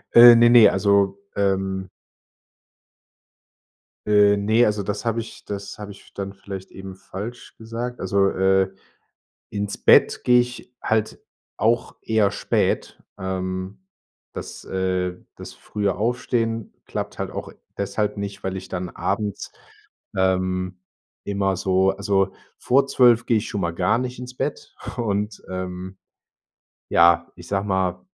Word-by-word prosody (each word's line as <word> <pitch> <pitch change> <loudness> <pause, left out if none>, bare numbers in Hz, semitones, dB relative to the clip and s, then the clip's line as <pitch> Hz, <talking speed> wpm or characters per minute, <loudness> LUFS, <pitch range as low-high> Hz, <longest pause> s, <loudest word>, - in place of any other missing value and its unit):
Äh, 120 0 +11
ne, 120 0 +6
ne, 120 -3 +8
also, 100 0 +2 0.2
ähm... 95 -1 0 2.2
Äh, 105 -1 +5
ne, 110 +4 +3
also 105 -1 0
das 105 +3 -4
habe 115 0 0
ich 115 - -12
das 100 +1 -6
habe 105 -1 -7
ich 100 - -16
dann 100 -1 -5
vielleicht 95 -1 -9
eben 95 0 -9
falsch 95 +5 -8
gesagt. 115 +2 -5
Also, 100 +1 +2
äh, 95 0 +2 0.8
ins 100 -1 -3
Bett - - +5
gehe 125 0 +6
ich 125 0 -5
halt 110 -1 0 0.4
auch 115 +2 +1
eher 110 -3 +2
spät. - - -1 0.2
Ähm, 95 +1 -4 0.5
das, - - -8
äh, 95 -1 -1 0.2
das - - -9
frühe 100 -2 -2
Aufstehen 115 0 -1
klappt - - -5
halt - - -3
auch - - -6 0.2
deshalb 100 +1 -1
nicht, 100 -1 -5
weil 95 0 -2
ich 95 - -8
dann 90 0 -4
abends, 105 +3 -3 0.6
ähm, 95 -1 0 0.5
immer 100 -1 0
so 95 0 +2
also 95 0 0 0.2
vor 135 +2 +2
12:00 120 -3 +4
gehe 115 - +3
ich 105 - -1
schon 105 - -3
mal 85 -2 -1
gar 90 +6 +1
nicht 125 0 -4
ins 125 0 -8
Bett 140 +2 -4 0.2
und 105 -3 -2
ähm, 95 0 -6 0.9
ja, 85 0 +4
ich 90 -1 -13
sage 100 0 -1
mal, 95 -2 -1
100 Hz, 135 wpm, -23 LUFS, 95-110 Hz, 2.2 s, Äh